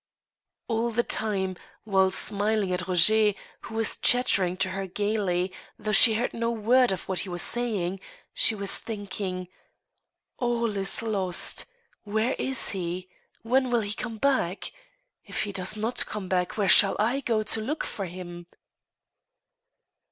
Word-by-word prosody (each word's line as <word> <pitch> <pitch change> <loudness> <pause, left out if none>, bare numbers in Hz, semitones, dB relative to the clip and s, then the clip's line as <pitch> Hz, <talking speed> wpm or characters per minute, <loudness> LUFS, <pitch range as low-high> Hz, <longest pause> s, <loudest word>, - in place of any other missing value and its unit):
All 230 0 0
the 235 +1 0
time, 190 -5 -2 0.3
while 190 -3 +2
smiling 205 0 +1
at 180 -1 -2
Roger, 210 +4 +4 0.3
who 220 - -9
was 225 -1 +3
chattering 195 -7 +3
to 190 - 0
her 190 +1 -4
gayly, 190 -2 -1 0.2
though 215 0 -3
she 220 +2 +6
heard 240 +3 -1
no 230 0 -1
word 235 +2 +3
of 190 - -4
what 190 -2 -1
he 190 - -4
was 175 -1 -1
saying, 205 -6 -1 0.3
she 225 - +2
was 200 -1 +1
thinking: 195 -4 -5 0.5
" - - -56
All 235 -3 -1
is 195 +3 +1
lost! 195 -5 0 0.4
Where 220 +4 0
is 265 0 +2
he? 180 -1 -4 0.3
When 255 +3 +1
will 240 -1 +2
he 205 0 -4
come 225 0 -6
back? 215 -7 0 0.5
If - - -3
he 205 - -4
does 195 +2 -1
not 225 +3 0
come 210 -3 -5
back, 180 +1 -1
where 205 -2 +1
shall 195 +1 +7
I 235 +6 +1
go 230 -5 0
to 220 +1 +1
look 290 +8 -3
for 195 - -5
him 175 -1 -9
210 Hz, 155 wpm, -26 LUFS, 185-225 Hz, 0.5 s, shall